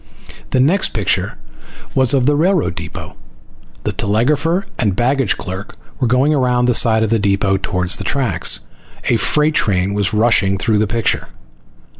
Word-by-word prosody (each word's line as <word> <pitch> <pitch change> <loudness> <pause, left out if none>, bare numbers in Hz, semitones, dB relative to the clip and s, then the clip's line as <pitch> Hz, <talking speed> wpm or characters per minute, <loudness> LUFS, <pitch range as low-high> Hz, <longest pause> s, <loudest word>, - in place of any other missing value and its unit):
The 130 - 0
next 170 +9 +2
picture 105 -4 -1 0.6
was 130 +1 +3
of 130 -2 +1
the 145 +2 +3
railroad 175 +2 +1
depot. - - -8 0.7
The - - -1
telegrapher 150 - 0
and 105 -6 0
baggage 130 +1 +1
clerk 95 +2 -7 0.2
were 130 - +1
going 130 +5 +2
around 125 -3 +1
the 125 - +2
side 110 -1 +3
of 110 - -2
the 115 - +2
depot 100 -1 +1
towards 90 -1 -1
the - - -6
tracks. 135 +5 +1 0.5
A - - +3
freight 150 +1 +2
train 100 -7 0
was 100 -2 0
rushing 105 -3 +2
through 105 +1 0
the 105 - +1
picture. 115 +2 -1
115 Hz, 160 wpm, -17 LUFS, 100-135 Hz, 0.7 s, was